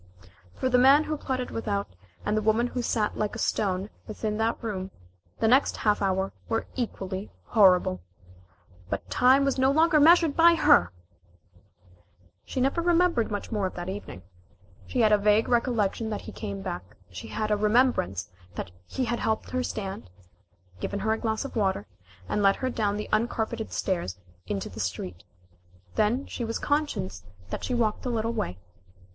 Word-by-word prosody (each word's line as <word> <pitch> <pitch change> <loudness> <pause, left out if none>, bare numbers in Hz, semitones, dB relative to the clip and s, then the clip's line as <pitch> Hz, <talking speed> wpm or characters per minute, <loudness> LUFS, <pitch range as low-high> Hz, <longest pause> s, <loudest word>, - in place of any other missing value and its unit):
For - - -1
the 250 -1 +4
man 275 +4 +7
who 310 - -2
plotted 260 -3 -3
without, 200 - -3 0.3
and 210 - +1
the 215 - +1
woman 220 +3 +2
who 245 0 -3
sat 220 -3 0
like 210 -1 -1
a - - -4
stone 195 0 -1 0.2
within 215 0 -3
that 225 +1 0
room, 190 -4 -3 0.5
the 225 - +1
next 260 +5 +4
half 210 -1 +1
hour 190 0 0 0.2
were 225 -1 0
equally 195 -5 -4
horrible. 180 - +4 0.9
But - - -3
time 260 +2 +5
was 275 -1 0
no 260 +1 +4
longer 315 +2 +4
measured 330 0 +6
by 335 +1 +6
her! 90 - +5 1.5
She - - -4
never 275 +6 +1
remembered 340 -8 +2
much 205 +2 -4
more 205 -4 0
of - - -9
that 175 +1 -5
evening. 190 - -7 0.6
She 250 - 0
had 215 -1 +5
a 210 - +5
vague 210 +2 +3
recollection 230 -3 +1
that 210 - -3
he - - -9
came 100 -1 -6
back. 90 +5 -6
She 90 - -8
had 215 -1 -2
a - - +4
remembrance 210 - +1 0.2
that 85 - -5 0.2
he 255 - -2
had 240 0 -1
helped 220 -1 -1
her 255 - 0
stand 195 - -5 0.7
given 200 - -3
her 220 +2 +1
a 220 - -3
glass 220 +2 -1
of 275 - -7
water 190 - 0 0.4
and 210 - 0
led 195 -1 +5
her 255 -1 -2
down 205 -3 0
the 210 - -4
uncarpeted 220 0 -1
stairs 170 - -2
out 90 -2 -28 0.2
into 100 -2 -2
the - - -10
street. 90 -1 -4 0.7
Then 235 +6 +1
she 240 - -5
was 230 0 -2
conscious 290 - -1 0.3
that - - -4
she 250 - -1
walked 220 -3 0
a 255 - -2
little 230 -1 -1
way. 90 - -3
220 Hz, 175 wpm, -27 LUFS, 195-250 Hz, 1.5 s, man